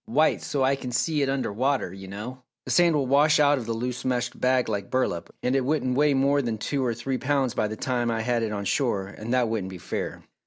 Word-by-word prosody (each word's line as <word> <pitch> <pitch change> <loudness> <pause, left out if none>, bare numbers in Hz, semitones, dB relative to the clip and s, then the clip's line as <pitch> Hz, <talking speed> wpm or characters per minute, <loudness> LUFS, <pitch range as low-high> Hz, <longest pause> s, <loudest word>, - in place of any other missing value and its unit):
White, 155 +2 +2
so 140 -2 -1
I 135 +1 +3
can 130 -2 -6
see 150 +5 +1
it 135 - +1
under 135 -6 -1
water, 130 +3 0
you 95 0 -9
know. 110 +7 -7 0.2
The - - -4
sand 170 -2 +4
will 140 -2 +1
wash 145 +4 +4
out 145 -1 +4
of 115 -2 -7
a - - +1
loose 125 +2 -3
meshed 125 -2 -2
bag 125 0 +2
like 100 -3 -3
burlap, 90 -10 -1
and 125 +2 +1
it 135 - +2
wouldn't 130 -2 0
weigh 145 0 +3
more 140 +1 +3
than 115 -4 -2
two 135 +5 -2
or 120 -2 0
three 130 +3 -3
pounds 135 -2 +1
by 105 - 0
the 110 +1 -6
time 120 -1 -1
I 115 -1 -1
had 120 0 0
it 110 -1 -1
on 100 -1 -3
shore, 110 -6 0
and 110 +3 -7
that 125 -2 +2
wouldn't 110 -4 -2
be 95 - -8
fair." - - -5
125 Hz, 260 wpm, -26 LUFS, 115-140 Hz, 0.2 s, sand